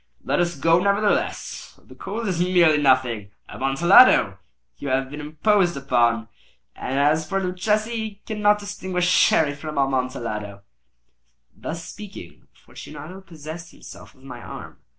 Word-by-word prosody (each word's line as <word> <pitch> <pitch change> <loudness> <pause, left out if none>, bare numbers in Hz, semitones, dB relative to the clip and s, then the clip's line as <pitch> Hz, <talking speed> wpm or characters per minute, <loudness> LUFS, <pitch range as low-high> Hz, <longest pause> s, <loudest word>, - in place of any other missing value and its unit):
"Let - - 0
us 175 -1 0
go, 165 +4 +3
nevertheless. 200 +2 -1
The - - -16
cold 220 +3 -5
is 180 -3 -1
merely 175 -4 +4
nothing. 125 -7 +2 0.2
Amontillado! 135 - +4 0.4
You 145 - -6
have 130 0 -1
been 150 0 -7
imposed 175 +3 +1
upon. 120 -4 +1 0.5
And 130 +2 -4
as 155 +2 +2
for 195 - 0
Luchesi, 210 +4 -1
he 220 -3 -5
cannot 210 -1 +2
distinguish 190 -3 -3
Sherry 160 -4 +3
from 150 +1 -7
Amontillado." 120 -7 -2 0.9
Thus 165 +1 -6
speaking, 195 - -11
Fortunato 180 +7 -11
possessed 165 -1 -10
himself - - -13
of 130 - -23
my 125 -3 -9
arm. - - -10
160 Hz, 130 wpm, -23 LUFS, 135-190 Hz, 0.9 s, merely